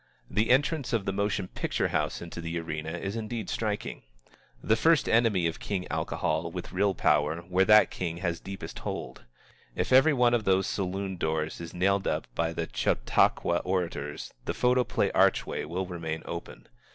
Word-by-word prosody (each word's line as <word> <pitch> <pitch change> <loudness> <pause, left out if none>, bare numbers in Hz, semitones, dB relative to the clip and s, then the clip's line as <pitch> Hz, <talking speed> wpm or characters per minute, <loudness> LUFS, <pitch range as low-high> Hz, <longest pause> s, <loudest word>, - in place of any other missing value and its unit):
The 110 +2 +1
entrance 140 +1 +2
of 110 -4 +1
the 95 - -1
motion 100 -1 -1
picture - - -1
house - - -1
into 85 0 -7
the 85 0 -3
arena 80 -1 -4
is 100 +4 -4
indeed 110 -1 -4
striking, 105 -2 -3 0.6
the 110 - +2
first 160 +6 +3
enemy 115 -6 +3
of 80 - -1
King 95 -3 -3
Alcohol 80 +2 -1
with 90 +1 -7
real 100 +1 +2
power 75 +1 +2
where 90 +2 +2
that 105 +1 +6
king 85 -2 -3
has 85 -2 -2
deepest 95 0 -7
hold. - - -6 0.5
If - - 0
every 135 +4 +7
one 125 -2 +3
of 120 -2 +2
those 95 -1 +3
saloon 95 0 -3
doors 80 0 -2
is 85 0 -8
nailed 95 +2 +2
up - - -1
by 80 0 0
the - - -3
Chautauqua 75 +7 +2
orators, 85 -7 -3
the - - -2
photoplay 125 -1 +2
archway - - +2
will 90 +4 -3
remain 80 -3 -5
open. 85 0 -7
95 Hz, 170 wpm, -28 LUFS, 85-105 Hz, 0.6 s, every